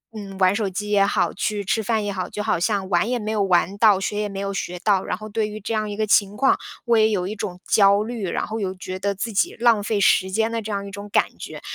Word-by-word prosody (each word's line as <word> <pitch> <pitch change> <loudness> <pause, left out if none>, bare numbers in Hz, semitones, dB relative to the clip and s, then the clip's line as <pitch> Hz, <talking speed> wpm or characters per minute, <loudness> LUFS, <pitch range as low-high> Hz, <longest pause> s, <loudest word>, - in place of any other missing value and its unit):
嗯， 200 -2 -8
玩 185 +1 +4
手 210 -1 0
机 210 +3 -5
也 200 -1 +4
好， - - 0
去 205 +1 -2
吃 220 +3 +1
饭 220 0 0
也 205 - -2
好。 185 -2 -3
就 210 - -5
好 210 -5 0
像 195 0 0
玩 175 +3 +2
也 250 - 0
没 215 0 -3
有 215 -2 0
玩 190 +1 +2
到， 210 -4 +5
学 205 +1 -2
也 210 - -1
没 195 0 -6
有 200 0 -2
学 180 -2 -4
到。 195 0 +2
然 - - -2
后 215 +1 -8
对 215 0 -1
于 215 +1 -7
这 220 +3 -4
样 215 -1 -1
一 - - -4
个 215 - +1
情 205 -1 +3
况， 270 0 +4 0.3
我 235 -1 +3
也 220 0 +4
有 185 -4 -1
一 215 - -4
种 180 -3 -5
焦 200 0 +5
虑， 225 -4 -4
然 - - -2
后 220 +1 -4
有 190 -2 -2
觉 185 0 -6
得 200 +1 -1
自 225 +4 -4
己 195 - +1
浪 230 -3 +4
费 210 0 0
时 190 -1 +3
间 220 +3 0
的 230 0 -2
这 215 0 -6
样 200 -1 -3
一 200 - -9
种 200 0 -8
感 - - +4
觉。 - - -8
205 Hz, 310 characters per minute, -22 LUFS, 195-215 Hz, 0.3 s, 到